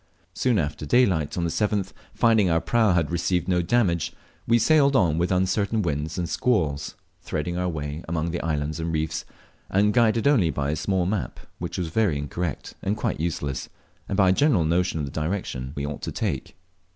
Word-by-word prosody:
Soon 125 -4 +1
after 75 -3 -2
daylight 85 - +2
on 85 - 0
the 85 - 0
7th, 105 -1 0 0.2
finding 110 -5 +3
our 80 0 +3
prau 110 0 +2
had 85 -2 +1
received 85 0 0
no 90 -1 +2
damage, 85 -4 +1 0.4
we 115 - +5
sailed 140 +3 +4
on 85 -9 +3
with 90 +2 0
uncertain 100 +4 +1
winds 75 +1 -2
and 90 -1 -1
squalls, 80 - 0 0.3
threading 80 +3 -3
our 90 0 -1
way 75 -1 -4
among 85 0 -2
islands 75 -1 -2
and 80 0 -2
reefs, 80 0 -2 0.4
and 105 +2 +3
guided 115 -1 +3
only 115 - +4
by 70 -2 -1
a - - 0
small 95 +1 0
map, 100 +1 -2 0.2
which - - -4
was 90 -3 -2
very 95 -4 +1
incorrect 75 +3 -4
and 105 +3 -1
quite - - -2
useless, 75 -5 -3 0.4
and 95 - -1
by 95 -2 +5
a - - +5
general 110 - +3
notion 85 +1 +1
of 75 - -1
the 70 - -7
direction 75 -5 -3
we 70 - -3
ought 75 0 -5
to - - -4
take. - - -3
85 Hz, 190 wpm, -25 LUFS, 80-105 Hz, 0.4 s, we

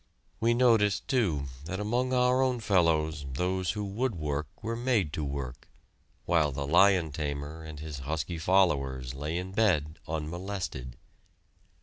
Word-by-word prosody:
We 115 +1 +3
noticed, 115 -5 +3
too, 95 - +1 0.2
that 95 +4 -4
among 120 +5 0
our 125 0 +3
own 130 -2 +1
fellows 80 -7 +2
those 90 +4 0
who 105 -1 -3
would 110 +3 -1
work 75 -2 -2 0.2
were 115 +2 -2
made 115 - +1
to 80 - -2
work, 70 -3 -5 0.6
while 80 -4 +3
the 70 +1 -3
"lion 90 +1 +4
tamer" 75 +1 -4
and 80 -2 -8
his 75 -2 -6
husky 80 +4 -3
followers 70 -9 +2
lay 75 +5 -3
in 90 +1 -4
bed 85 -8 +1
unmolested. 80 -5 -4
85 Hz, 140 wpm, -29 LUFS, 75-105 Hz, 0.6 s, lion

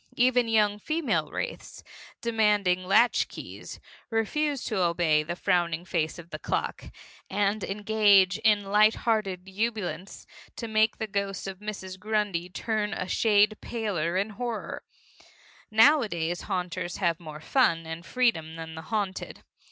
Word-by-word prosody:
Even 245 -1 +3
young 210 -2 +2
female 315 +7 -1
wraiths, - - -6 0.4
demanding 210 -5 +2
latchkeys, 230 +6 0 0.3
refuse 275 +5 0
to 215 -4 -1
obey 170 -3 +2
the 165 +3 -4
frowning 175 -2 0
face 160 -3 -1
of 170 0 -12
the - - -5
clock, - - -3 0.4
and 205 +1 0
engage 205 -2 +3
in 210 -2 +3
light 210 +2 +4
hearted 195 -5 0
ebullience 195 -4 -3 0.3
to 230 - -5
make 220 0 +2
the 220 - -2
ghost 200 -2 -3
of 190 -1 -6
Mrs. 190 -3 -7
Grundy 210 -4 -1
turn 215 +2 -2
a 185 - -3
shade 210 0 +3
paler 185 -7 -2
in 200 +3 -1
horror. 235 +2 -4 0.9
Nowadays 215 - +3
haunters 180 -2 -3
have 170 -4 0
more 155 -3 -9
fun 165 - +2
and 160 +1 -6
freedom 170 -9 0
than 160 0 -7
the 160 - -7
haunted. 200 +1 -4
205 Hz, 135 wpm, -27 LUFS, 175-220 Hz, 0.9 s, light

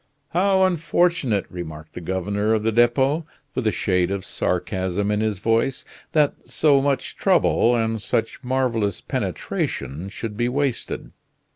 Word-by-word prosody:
"How 190 +2 +3
unfortunate," 170 - +2
remarked 80 -3 -8
the - - -7
governor 100 +5 0
of 110 - -1
the 115 - +2
Depot, 130 +7 +3 0.3
with 125 -4 -1
a - - +4
shade 90 -4 +1
of 100 -1 -3
sarcasm 95 +2 -1
in 105 - +1
his 110 -2 0
voice, 115 +6 0 0.3
"that 150 -2 +1
so 145 -3 +4
much 140 -1 -1
trouble, 120 +1 +3
and 115 -1 0
such 115 +6 -2
marvelous 125 -6 0
penetration, 80 +8 -3
should 105 +1 -6
be 120 +2 0
wasted!" 135 -1 -2
115 Hz, 140 wpm, -23 LUFS, 100-135 Hz, 0.3 s, a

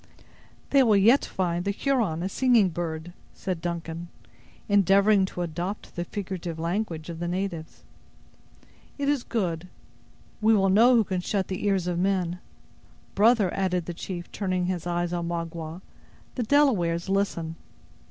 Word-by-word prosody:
"They 275 - +6
will 220 -5 +5
yet 230 +8 +5
find 175 -2 -1
the 200 - -1
Huron 205 - 0
a - - 0
singing 235 -3 +3
bird," 165 0 -5 0.2
said 185 -4 -4
Duncan, 170 0 -4 0.6
endeavoring 200 0 +4
to 180 - -4
adopt 175 +5 -5
the 175 - -3
figurative 180 -4 -5
language 165 -1 -2
of 165 - -8
the 175 - -2
natives. 175 -3 -4 1.1
"It 285 -1 -2
is 285 -2 +2
good. 180 -6 -2 0.7
We 220 +1 +5
will 195 -1 +3
know 230 +6 +6
who 230 - +5
can 185 -2 -2
shut 190 0 -1
the 185 +1 -3
ears 195 -3 +1
of 175 -1 -1
men. 180 -2 0 0.7
Brother," 210 -2 +4
added 180 -3 0
the 175 - -5
chief 175 0 -6
turning 185 -3 -1
his 175 -2 -3
eyes 175 0 -1
on 170 -1 -2
Magua, 170 0 -5 0.5
"the 255 - -3
Delawares 215 -11 +2
listen." 190 -5 -1
185 Hz, 150 wpm, -26 LUFS, 170-205 Hz, 1.1 s, They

